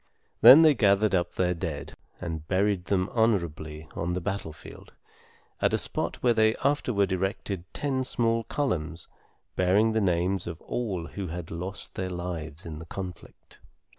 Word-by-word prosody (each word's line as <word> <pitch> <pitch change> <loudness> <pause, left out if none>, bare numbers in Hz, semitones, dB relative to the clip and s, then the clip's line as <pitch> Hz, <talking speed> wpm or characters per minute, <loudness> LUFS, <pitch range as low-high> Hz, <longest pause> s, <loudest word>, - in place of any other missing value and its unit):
Then 155 +5 +10
they 155 -2 +7
gathered 100 -3 +3
up 90 -2 0
their 90 -1 +1
dead, 80 -4 -5 0.3
and 80 -3 -5
buried 95 -1 +1
them 95 0 +1
honorably 85 -9 0
on 85 +1 -2
the 90 - -1
battlefield, 95 -4 -7 0.7
at - - +3
a - - +2
spot - - -3
where 120 -2 +5
they 110 0 +3
afterward 120 -9 +1
erected 95 -2 -3
ten 135 -3 -1
small 115 -2 0
columns 85 - -2 0.5
bearing 100 +5 +3
the 110 0 +1
names 90 0 0
of 85 -2 -6
all 100 -9 -3
who 95 +2 -6
had 85 0 -6
lost 90 +5 -5
their 95 0 -3
lives 85 -2 -5
in 80 -2 -7
the 80 - -9
conflict. 95 -1 -9
95 Hz, 155 wpm, -27 LUFS, 85-110 Hz, 0.7 s, Then